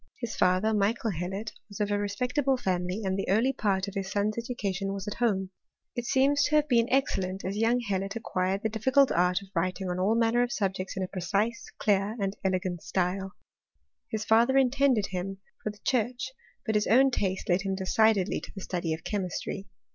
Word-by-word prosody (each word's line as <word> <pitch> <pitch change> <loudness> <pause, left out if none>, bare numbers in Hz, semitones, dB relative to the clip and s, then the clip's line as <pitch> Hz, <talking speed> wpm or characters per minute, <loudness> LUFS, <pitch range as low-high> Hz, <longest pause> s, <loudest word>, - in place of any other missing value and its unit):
His 235 -3 -5
father, 185 +4 +3
Michael 215 +2 +1
Hd 190 +5 -4 0.2
was 205 - -9
of 205 -1 0
a 205 - +1
respectable 250 +7 0
family, 185 -1 -1
and 190 0 0
the - - -3
early 230 +7 +3
part 200 -5 0
of' 200 - -6
son's 205 +2 -1
education 200 -5 -3
was 195 +1 -5
at 210 - -2
home; 195 -6 +1 0.4
it 240 -1 -3
seems 280 +3 +3
to 305 - +1
have 300 0 +4
b 240 -4 +4
excellent, 190 -8 0
as 190 +2 -2
young 225 +3 +2
Hellot 195 -2 -2
acquired 195 -3 -1
the 220 - +1
difficult 260 +6 +3
of 180 +1 +2 0.2
writing 185 +2 -1
on 180 - -2
all 200 +5 +2
manner 230 +1 +3
of 245 0 0
subjects 190 -3 -2
in 190 - 0
a - - -2
precise, 200 +6 -1 0.2
di 205 0 +2
and 195 0 -1
elegant 185 -2 -1
style. 190 +1 -1 0.8
His 215 -1 -3
father 235 +4 +4
intended 265 -4 +3
him 190 +1 -3 0.2
for 215 - -2
church; 250 +1 0 0.3
but 220 - 0
his 210 -1 +2
own 265 +4 +5
taste 190 -5 -1
led 180 +1 +2
him 195 0 -1
decidedly 200 0 +2
16*' 195 - -9
study 170 -3 -2
of 160 - -14
chemistry. 195 0 -3
205 Hz, 185 wpm, -28 LUFS, 190-235 Hz, 0.8 s, own